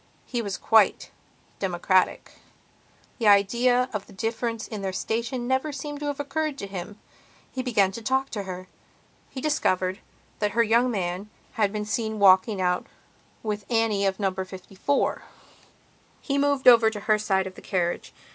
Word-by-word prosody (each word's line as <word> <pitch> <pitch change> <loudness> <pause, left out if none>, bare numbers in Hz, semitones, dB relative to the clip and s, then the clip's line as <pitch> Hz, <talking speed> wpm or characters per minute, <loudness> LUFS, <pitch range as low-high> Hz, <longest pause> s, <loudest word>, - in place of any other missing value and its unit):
He 240 -2 -2
was 200 -3 -4
quite 220 -3 +3 0.5
democratic; 185 0 +1 0.9
the 225 - +1
idea 240 +5 +4
of 205 -2 -4
the - - -15
difference 225 +2 -3
in 215 -3 -6
their 190 -1 -2
station 235 +5 -2
never 265 +4 0
seems 290 +1 -6
to 295 - -4
have 290 -1 -3
occurred 300 0 -2
to 200 - -5
him. 195 +1 -7 0.5
He 260 - -3
began 215 -7 +2
to 230 - -7
talk 265 +4 0
to 210 - -3
her. 185 -1 -7 0.6
He 260 - -7
discovered 190 -11 0 0.4
that 210 -1 0
her 235 +1 +4
young 235 +3 +3
man 190 -2 -3 0.2
had 210 -3 +1
been 210 0 -3
seen 220 +1 -2
walking 195 +1 +5
out 180 -1 0 0.6
with 210 -2 -3
Annie 225 -4 +2
of 190 +1 -2
Number 190 -2 -1
54. 190 +8 -2 1.0
He 280 -1 -1
moved 280 -2 +1
over 230 -2 +8
to 210 -2 -7
her 215 0 +2
side 190 -2 +1
of 190 - -6
the - - -13
carriage. 175 -2 -2
215 Hz, 165 wpm, -25 LUFS, 195-245 Hz, 1.0 s, over